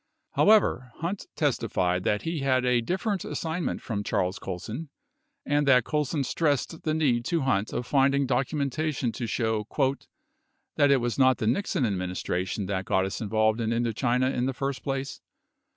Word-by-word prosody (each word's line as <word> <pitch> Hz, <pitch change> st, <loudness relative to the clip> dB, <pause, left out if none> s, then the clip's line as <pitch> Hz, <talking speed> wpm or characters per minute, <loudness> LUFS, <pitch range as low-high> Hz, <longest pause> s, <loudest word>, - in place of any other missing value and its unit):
42 -, -, 0 dB
However, 130 Hz, -, +4 dB
Hunt 180 Hz, +4 st, -4 dB
testified 95 Hz, -, 0 dB
that 105 Hz, -, +1 dB
he 165 Hz, -1 st, -2 dB
had 130 Hz, -2 st, +1 dB
a 125 Hz, -1 st, +3 dB
different 185 Hz, -, -1 dB
assignment 165 Hz, +1 st, -3 dB
from 105 Hz, -3 st, -3 dB
Charles 90 Hz, -1 st, -1 dB
Colson, 110 Hz, -, -6 dB, 0.6 s
and 145 Hz, 0 st, +1 dB
that 125 Hz, -3 st, +6 dB
Colson 150 Hz, 0 st, -1 dB
stressed 150 Hz, +2 st, 0 dB
the 155 Hz, -1 st, -1 dB
need 130 Hz, -7 st, +2 dB
to 170 Hz, 0 st, 0 dB
Hunt 110 Hz, -6 st, 0 dB
of 120 Hz, -, -3 dB
finding 140 Hz, +1 st, +3 dB
documentation 140 Hz, +1 st, -1 dB
to 120 Hz, +1 st, -4 dB
show 110 Hz, -2 st, -1 dB, 1.1 s
"that 145 Hz, -, +4 dB
it 140 Hz, -, +6 dB
was 120 Hz, +2 st, -2 dB
not 130 Hz, -1 st, +5 dB
the -, -, -2 dB
Nixon 130 Hz, -, +1 dB
administration 90 Hz, 0 st, -2 dB
that 95 Hz, 0 st, -2 dB
got 95 Hz, 0 st, +2 dB
us 95 Hz, -, -4 dB
involved 110 Hz, +1 st, +1 dB
in 110 Hz, -, 0 dB
Indochina 120 Hz, +2 st, +1 dB
in 125 Hz, +1 st, 0 dB
the 135 Hz, -, -2 dB
first 135 Hz, 0 st, -3 dB
place. 135 Hz, -1 st, -4 dB
125 Hz, 165 wpm, -27 LUFS, 110-145 Hz, 1.1 s, that